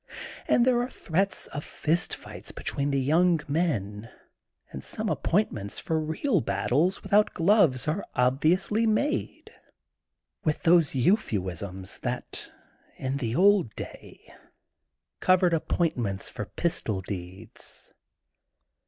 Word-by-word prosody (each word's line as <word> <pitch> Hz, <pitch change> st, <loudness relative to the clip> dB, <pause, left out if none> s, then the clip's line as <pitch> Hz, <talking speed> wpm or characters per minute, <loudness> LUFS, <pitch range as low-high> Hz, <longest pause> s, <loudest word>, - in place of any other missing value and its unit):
And 240 Hz, -, +4 dB
there 250 Hz, -2 st, +3 dB
are 245 Hz, -, -3 dB
threats 195 Hz, -2 st, -1 dB
of 145 Hz, -, -6 dB
fist 165 Hz, +3 st, -1 dB
fights -, -, -9 dB
between 140 Hz, 0 st, -2 dB
the 140 Hz, -1 st, +1 dB
young 165 Hz, +5 st, +3 dB
men 115 Hz, -, -1 dB, 0.6 s
and 70 Hz, -, -7 dB
some -, -, -4 dB
appoint 205 Hz, +5 st, +1 dB
ments 100 Hz, -1 st, -5 dB
for 160 Hz, -1 st, -1 dB
real 160 Hz, -, 0 dB
battles 125 Hz, -, 0 dB
without 210 Hz, +1 st, +3 dB
gloves 165 Hz, -, +3 dB
are 160 Hz, +6 st, -1 dB
ob 125 Hz, +1 st, +2 dB
viously 195 Hz, +7 st, +2 dB
made, 280 Hz, +8 st, -1 dB, 0.9 s
with 155 Hz, -1 st, -1 dB
those 165 Hz, -4 st, +4 dB
euphuisms 95 Hz, -, -1 dB
that -, -, -4 dB, 0.5 s
in 130 Hz, +1 st, -2 dB
the 120 Hz, -4 st, -2 dB
old 190 Hz, -, +4 dB
day -, -, -10 dB, 0.9 s
covered 185 Hz, -1 st, +4 dB
appointments 125 Hz, -, -1 dB
for 105 Hz, -, -5 dB
pistol 110 Hz, -, -2 dB
deeds. 95 Hz, -1 st, -9 dB
155 Hz, 120 wpm, -27 LUFS, 110-185 Hz, 0.9 s, And